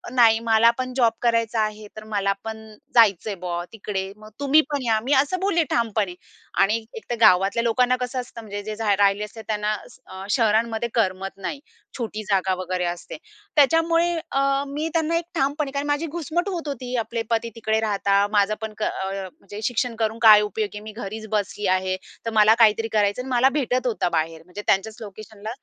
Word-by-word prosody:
"नाही, 225 -3 +6
मला 225 +1 +6
पण 255 0 -3
जॉब 235 -3 +4
करायचा 230 -1 +1
आहे, 215 0 -3
तर 215 - -8
मला 200 -1 +1
पण 220 0 -7 0.3
जायचंय 210 -3 +4
बुआ 175 -1 -2
तिकडे 195 -3 -4
मग 215 0 -13
तुम्ही 285 +2 +5
पण 285 -2 -1
या." 220 -2 +2
मी 270 +4 +1
असं 370 +6 -3
बोलले 375 -4 +2
ठामपणे 215 -5 0 0.5
आणि 220 +3 +2
एकतर 445 - -5
गावातल्या 195 +3 +5
लोकांना 245 +2 +2
कसं 250 +1 -2
असतं 235 -1 -10
म्हणजे 205 -2 -6
जे 215 +1 -5 0.2
राहिले 200 +1 +2
असते, 215 +2 -8
त्यांना 210 - -3 0.4
अ, 190 0 -9
शहरांमध्ये 225 0 +1
करमत 195 -3 -1
नाही. 195 +9 -5 0.4
छोटी 215 -3 -4
जागा 190 -1 +2
वगैरे 185 -1 -2
असते. 175 0 -5 0.4
त्याच्यामुळे 330 +3 +4 0.2
अ, 275 0 +1
मी 295 +3 -3
त्यांना 330 0 +1
एक 335 - -3
ठामपणे 285 0 0
कारण 280 +1 -3
माझी 290 +3 0
घुसमट 340 +3 -2
होत 340 -5 -4
होती, 255 -3 -4
आपले 230 0 -2
पती 230 0 0
तिकडे 220 -1 0
राहतात, 200 -2 +1
माझं 205 0 +3
पण 220 -1 -5
क 215 - -3
अ, 190 -1 -2 0.3
म्हणजे 205 +2 -9
शिक्षण 245 0 -1
करून 220 +1 -1
काय 215 -2 +9
उपयोगी 210 0 -3
आहे, - - -8
मी 215 - -8
घरीच 220 0 -7
बसली 210 -1 -1
आहे, 185 0 -1 0.3
तर - - 0
मला 215 +1 +7
काहीतरी 225 0 +4
करायचं 205 +2 +2
आणि 260 - -8
मला 255 +2 +4
भेटत 255 -1 0
होता 220 -6 0
बाहेर. 160 -1 -2
म्हणजे 180 +3 -8
त्यांच्याच 205 +3 +1
लोकेशनला. 215 0 -9
220 Hz, 185 wpm, -23 LUFS, 205-255 Hz, 0.5 s, काय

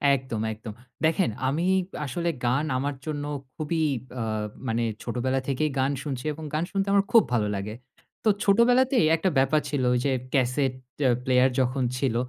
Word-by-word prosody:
একদম, 125 -4 -4
একদম। 110 0 -8 0.3
দেখেন 170 +3 +2 0.2
আমি 155 +6 0 0.4
আসলে 170 +6 -2 0.2
গান 130 +5 +2
আমার 140 +2 -2
জন্য 145 -2 -3 0.3
খুবই 160 +1 -1 0.4
আ - - -2 0.5
মানে 115 0 0 0.2
ছোটবেলা 130 +2 -1
থেকেই 140 +3 0
গান 135 +1 +2
শুনছি 135 -3 -4
এবং 160 +2 -9
গান 155 - +1
শুনতে 195 0 0
আমার 200 0 +4
খুব 230 - +8
ভালো 110 -3 +2
লাগে। 100 +2 -4 0.5
তো 220 - +4
ছোটবেলাতেই 245 - +4
একটা 165 +4 +1
ব্যাপার 135 +3 +3
ছিল 140 -3 -1 0.2
যে 140 - +1 0.2
ক্যাসেট 130 0 +2 0.3
অ্যা 135 - +4 0.2
প্লেয়ার 130 0 +4
যখন 130 +1 +1
ছিল 125 -3 0
140 Hz, 160 wpm, -26 LUFS, 125-160 Hz, 0.5 s, খুব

